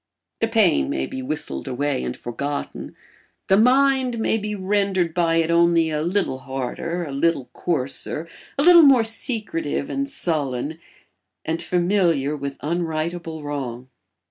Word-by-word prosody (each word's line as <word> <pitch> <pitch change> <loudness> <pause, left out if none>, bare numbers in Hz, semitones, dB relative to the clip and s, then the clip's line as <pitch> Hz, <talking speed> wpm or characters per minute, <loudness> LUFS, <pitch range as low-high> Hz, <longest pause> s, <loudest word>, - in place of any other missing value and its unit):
The 225 - +1
pain 210 - +3
may 65 - -1
be 130 - -6
whistled 130 - -4
away 140 +1 -1
and - - -4
forgotten; 140 +4 -5 0.5
the 190 - +6
mind 260 +2 +3
may 225 0 +1
be 210 0 -4
rendered 190 -3 0
by 165 -1 +2
it 165 0 +2
only 170 -1 +3
a 150 -1 -1
little 175 -5 -1
harder, 135 +7 -4
a 145 - -6
little 140 -1 0
coarser, 155 0 -2 0.3
a 280 - +2
little 345 0 +9
more 270 -6 +6
secretive 220 - -1
and 275 0 -2
sullen 155 - -2 0.7
and 165 +1 -2
familiar 175 -6 +1
with 140 -1 -5
unrightable 165 0 -3
wrong. 130 -4 -5
165 Hz, 140 wpm, -22 LUFS, 140-205 Hz, 0.7 s, little